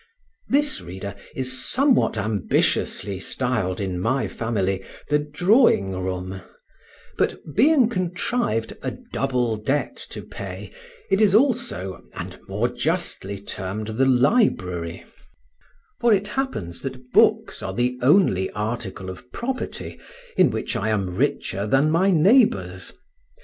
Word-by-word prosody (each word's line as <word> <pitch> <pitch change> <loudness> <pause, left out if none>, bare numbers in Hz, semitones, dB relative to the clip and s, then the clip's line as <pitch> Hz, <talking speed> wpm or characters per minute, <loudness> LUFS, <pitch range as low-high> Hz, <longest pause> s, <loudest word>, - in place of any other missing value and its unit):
This, 290 +1 +2
reader, 95 +3 -7 0.2
is 130 -1 -2
somewhat 265 - +2
ambitiously 100 -1 0
styled 115 -5 -1
in 95 -3 -2
my 130 +8 0
family 95 -4 -1 0.3
the 150 - +4
drawing 150 - +3
room; 95 0 -4 0.8
but - - +1 0.2
being 265 - +5
contrived 180 - -1
"a - - -4 0.2
double 125 -4 0
debt 135 +7 -1
to - - -7
pay," - - -8 0.4
it 195 - +3
is 205 -2 +5
also, 235 - +1
and - - -7
more - - 0
justly, 100 +1 -2
termed 100 +2 -5
the 120 +5 +1
library, 125 - +2 1.0
for 235 - +3
it 205 0 +2
happens 160 - -3
that 130 -1 -7
books - - +3
are 95 - -4
the 125 +1 0
only 125 - +4
article 105 -3 -4
of 95 +7 -9
property 255 +2 -4 0.4
in - - +5
which - - -3
I 110 - -1
am 95 -4 -1
richer 105 -5 -1
than 135 +6 +3
my 180 +5 +3
neighbours. 210 - +3
125 Hz, 125 wpm, -23 LUFS, -, 1.0 s, being